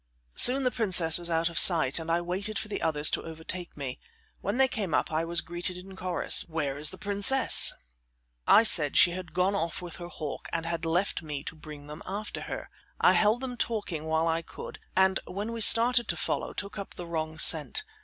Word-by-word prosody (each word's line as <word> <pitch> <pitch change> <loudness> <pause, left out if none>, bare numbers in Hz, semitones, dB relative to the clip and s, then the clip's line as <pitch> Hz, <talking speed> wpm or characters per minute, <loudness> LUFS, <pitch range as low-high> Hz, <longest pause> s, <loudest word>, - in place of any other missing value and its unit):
Soon 265 +2 +5
the 255 - +1
princess 180 -9 +1
was 175 0 -6
out 165 0 0
of 170 -1 +1
sight, 160 -5 +5
and 165 0 -8
I 170 +1 +1
waited 195 +5 -4
for 210 - -4
the - - -5
others 155 -2 +2
to - - -1
overtake 165 +2 -7
me. 135 -3 -6 0.4
When 200 +4 -3
they 265 0 +4
came 200 - -3
up - - -1
I 160 +1 -1
was 170 0 +1
greeted 175 +1 -4
in 190 +1 -12
chorus: 185 -1 +2
"Where 150 -4 -3
is 150 +1 +4
the - - -8
princess?" 205 +6 +4 0.8
I 220 - +6
said 150 -10 +4
she 175 - +6
had 180 -1 -8
gone 185 +2 0
off 170 -4 -3
with 175 -2 -9
her 175 -2 -8
hawk, 155 -4 -8
and 165 -1 -3
had 165 -1 -4
left 175 +4 -1
me 150 -3 -6
to 160 - -8
bring 150 -2 -12
them 150 +1 -10
after 205 +3 -5
her. - - -7 0.3
I - - +4
held 220 +4 +2
them 250 -2 -6
talking 205 -10 -3
while 160 +1 0
I 165 0 -1
could, - - -11 0.2
and 190 0 +2
when 205 +4 -5
we 230 - -5
started 240 +2 +4
to - - -2
follow - - -3
took 200 0 -7
up 200 - -8
the 175 - -8
wrong 160 -1 -5
scent. 160 - +4
175 Hz, 215 wpm, -27 LUFS, 160-200 Hz, 0.8 s, I